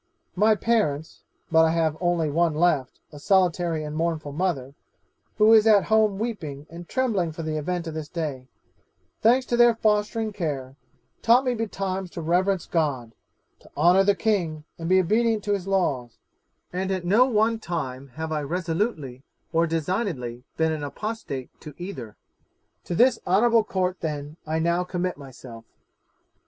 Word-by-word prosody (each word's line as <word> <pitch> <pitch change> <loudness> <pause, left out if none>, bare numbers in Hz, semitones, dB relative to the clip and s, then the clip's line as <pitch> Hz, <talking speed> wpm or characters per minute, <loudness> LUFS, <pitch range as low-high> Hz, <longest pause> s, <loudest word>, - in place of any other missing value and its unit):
'My 215 +3 +4
parents 205 -10 -1 0.3
(but 160 0 +6
I 160 - +4
have 160 -2 +1
only 175 -3 +1
one 165 0 +1
left, 155 -5 +1
a 150 - -11
solitary 175 -2 +1
and 150 0 -6
mournful 160 -2 -2
mother, 140 -5 -2 0.6
who 215 +1 +6
is 220 0 +6
at 210 -3 +6
home 215 -3 +3
weeping 165 -11 -5
and 170 0 -10
trembling 210 -10 0
for 165 +1 -7
the 155 0 -3
event 170 +3 -2
of 160 - -5
this 155 -1 -5
day), 145 -7 -4 0.7
thanks 250 +4 +4
to 240 - 0
their 240 -1 +5
fostering 215 0 0
care, 140 -8 -4 0.5
taught 240 +3 +4
me 250 - +1
betimes 195 -4 -3
to 170 - -5
reverence 180 +3 +1
God, 135 -9 -1 0.5
to - - -19
honour 175 +5 +5
the 200 0 +3
king, 175 -9 -1 0.2
and 165 0 -4
be 185 0 +5
obedient 220 +3 +1
to 205 - 0
his 195 -2 -3
laws; 140 -12 -1 0.6
and 190 +1 -2
at 185 -2 -2
no 215 +8 +5
one 225 -1 +2
time 140 -8 -4
have 160 0 -4
I 155 -1 -1
resolutely 165 - -2 0.3
or 165 +1 +3
designedly 160 - -2
been 160 0 +2
an 155 -2 -3
apostate 145 - -5
to 150 -2 -10
either. 135 - -7 0.7
'To 175 - -3
this 245 +4 +4
honourable 225 +5 +4
Court, 185 -3 -1
then, 150 -1 -5
I 160 +1 -1
now 170 +2 +1
commit 180 0 -3
myself. 125 -4 -11
175 Hz, 160 wpm, -25 LUFS, 155-205 Hz, 0.7 s, but